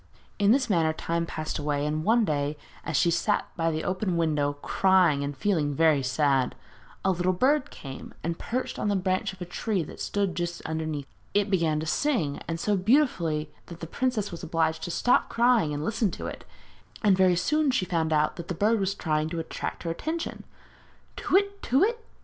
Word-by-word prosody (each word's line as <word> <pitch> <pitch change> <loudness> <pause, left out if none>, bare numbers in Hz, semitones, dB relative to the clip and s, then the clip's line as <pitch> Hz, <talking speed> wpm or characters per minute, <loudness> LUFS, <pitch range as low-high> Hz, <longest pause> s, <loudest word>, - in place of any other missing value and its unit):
In 205 0 +5
this 260 +2 +3
manner 165 -5 +2
time 170 +1 -2
passed 155 -1 -4
away, 145 -1 -1
and 155 +1 -1
one 225 +4 +3
day, 145 -2 -1 0.3
as 155 - -1
she 170 - +3
sat 210 +5 +1
by 165 -2 +1
the 160 0 -2
open 185 -1 -1
window 150 -3 +1
crying 170 0 +3
and 140 0 -4
feeling 150 -5 0
very 155 -2 +4
sad, 130 0 +1 0.5
a 190 - +4
little 180 +1 +1
bird 265 +9 +2
came 135 -2 -9
and 165 +1 -3
perched 255 +2 -3
on - - -1
the 205 - +2
branch 185 0 0
of 190 - -14
a - - -3
tree 190 +1 -2
that - - -10
stood 200 -3 -1
just 175 -1 -3
underneath. 160 -3 -3 0.3
It 205 0 +2
began 165 -5 +2
to - - -4
sing, 170 - 0
and 165 0 -3
so 205 +4 +1
beautifully 180 - +1 0.2
that 170 -1 -10
the 165 - -5
princess 220 +2 -1
was 170 - -7
obliged 160 -1 0
to - - -5
stop 245 +8 +2
crying 235 -9 +3
and 145 +1 -3
listen 220 0 +1
to - - -6
it, - - -7 0.6
and 200 -3 +5
very 185 -1 +4
soon 300 - +1
she 255 -8 +1
found 165 -3 0
out 150 0 +2
that 170 -1 -7
the 180 - -3
bird 215 +5 +2
was 195 0 0
trying 155 -3 -1
to 170 0 -3
attract 160 - -5
her 165 - -2
attention. 320 - -4 0.7
'_Tu - - -8
whit, 400 +1 +2
tu 265 +4 +2
whit! 460 +3 +1
175 Hz, 200 wpm, -27 LUFS, 155-210 Hz, 0.7 s, In